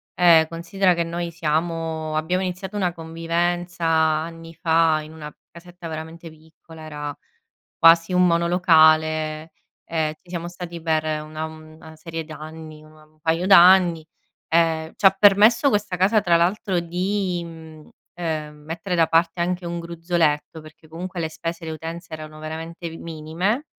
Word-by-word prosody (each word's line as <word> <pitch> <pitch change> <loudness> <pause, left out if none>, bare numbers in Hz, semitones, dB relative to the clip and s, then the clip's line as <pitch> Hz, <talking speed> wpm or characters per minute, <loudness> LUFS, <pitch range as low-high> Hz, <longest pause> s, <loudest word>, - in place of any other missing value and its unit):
Ehm, 165 -3 +6
considera 175 +3 0
che 170 - 0
noi 170 +1 -4
siamo 160 -1 -2
abbiamo 180 +4 0
iniziato 185 +2 -5
una 185 -4 0
convivenza 170 +1 -2
anni 165 +1 0
fa, 165 -2 +2
in 155 +1 -12
una 150 -1 -9 0.2
casetta 175 0 -11
veramente 160 +1 -8
piccola, 160 +1 -16
era 150 -1 -6 0.6
quasi 165 +2 +6
un 180 0 +4
monolocale, 160 -2 +3 0.3
e 155 -2 -2
ci 175 - -24
siamo 170 -1 -4
stati 175 -1 -8
per 160 -1 0 0.2
una 155 +1 -6
una 160 0 -12
serie 165 +1 -6
d'anni, 155 0 -10
una 155 0 -18
un 155 0 -31
paio 165 +3 0
d'anni. 180 -3 +6 0.4
Ehm, 160 -1 +1
ci - - -3
ha 195 - +9
permesso 205 +7 +5
questa 205 -4 -1
casa, 200 +4 +3
tra 170 -3 +3
l'altro, 185 +2 0
di, 180 +1 -2
mhmm, 160 -2 -12 0.3
ehm, 155 -3 -4
mettere 165 +3 -4
da 165 -2 +3
parte 165 +1 +1
anche 180 +1 -2
un 170 0 -4
gruzzoletto, 165 -2 -1
perché 155 +1 -16
comunque 175 +3 -7
le 160 -1 -2
spese, 165 +1 -6
le 160 - -4
utenze 165 +2 -7
erano 155 -1 -8
veramente 165 +2 -7
minime, 170 - -3
165 Hz, 150 wpm, -22 LUFS, 160-175 Hz, 0.6 s, ha